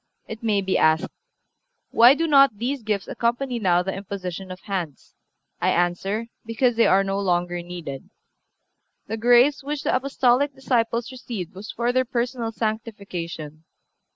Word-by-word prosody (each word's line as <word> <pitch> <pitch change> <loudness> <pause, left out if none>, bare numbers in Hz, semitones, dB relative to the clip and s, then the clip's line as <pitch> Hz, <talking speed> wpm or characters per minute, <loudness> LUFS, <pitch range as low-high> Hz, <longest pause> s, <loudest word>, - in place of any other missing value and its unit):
It 220 0 -8
may 215 -3 +1
be 190 0 0
asked: 155 0 +3 0.8
Why 240 +4 +7
do 330 - 0
not 275 -7 +5
these 255 +5 -2
gifts 210 -3 -2
accompany 240 +1 -1
now 180 -4 +2
the 190 +1 -3
imposition 190 -1 -6
of 185 0 -8
hands? 175 -8 -5 0.5
I - - +2
answer: 185 +5 0 0.2
Because 230 +2 +1
they 230 - +4
are 195 +1 +4
no 195 0 -2
longer 175 -2 0
needed. 170 -6 -8 1.0
The 225 - -4
grace 245 +5 +4
which 290 +1 -4
the - - +1
Apostolic 265 +1 +1
disciples 235 -2 0
received 230 -8 -6
was 195 +3 -8
for 240 +1 -1
their 255 0 +3
personal 240 -1 -2
sanctification. 195 -9 -5
220 Hz, 150 wpm, -23 LUFS, 185-245 Hz, 1.0 s, Why